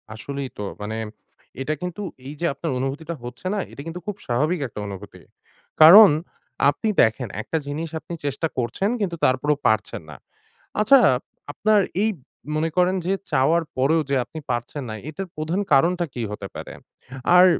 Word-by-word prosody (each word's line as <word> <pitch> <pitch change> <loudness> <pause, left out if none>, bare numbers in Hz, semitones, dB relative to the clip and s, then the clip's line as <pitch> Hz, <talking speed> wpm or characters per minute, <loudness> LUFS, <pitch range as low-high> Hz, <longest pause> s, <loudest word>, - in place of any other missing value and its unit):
আসলেই 140 +3 -5
তো 105 - -4 0.2
মানে 105 +2 -4 0.7
এটা 150 +3 -1
কিন্তু 180 +3 -4 0.3
এই 145 - -6
যে - - +1
আপনার 155 +3 -4
অনুভূতিটা 145 +6 -3
হচ্ছে 120 +8 -7
না? 210 - -1
এটা - - -9
কিন্তু 165 +2 -5
খুব 210 - -2
স্বাভাবিক 150 +9 +1
একটা 115 - -9
অনুভূতি। 100 0 -9 0.6
কারণ 195 +7 +11 0.6
আপনি 145 +10 -1
দেখেন 115 +3 +2
একটা 160 - -2
জিনিস 155 +3 -3
আপনি 170 - -9
চেষ্টা 145 +3 -1
করছেন 125 - 0
কিন্তু 180 -4 -1
তারপরেও 135 +3 +2
পারছেন 110 -4 0
না। 75 - -9 0.6
আচ্ছা 225 +6 +7 0.5
আপনার 215 +7 +3 0.2
এই 220 - +3 0.5
মনে 160 +1 +1
করেন 180 +1 +3
যে 190 - +1 0.2
চাওয়ার 155 +5 +3
পরেও 150 +5 +3
যে 140 - +2
আপনি 160 - -8
পারছেন 120 +4 -3
না, - - -4 0.2
এটার 190 +5 -6
প্রধান 155 +5 -2
কারণটা 175 +6 +3
কী 120 - -4
হতে 105 -1 -6
পারে? - - -7 0.6
আর 180 - +9
155 Hz, 165 wpm, -23 LUFS, 130-175 Hz, 0.7 s, কারণ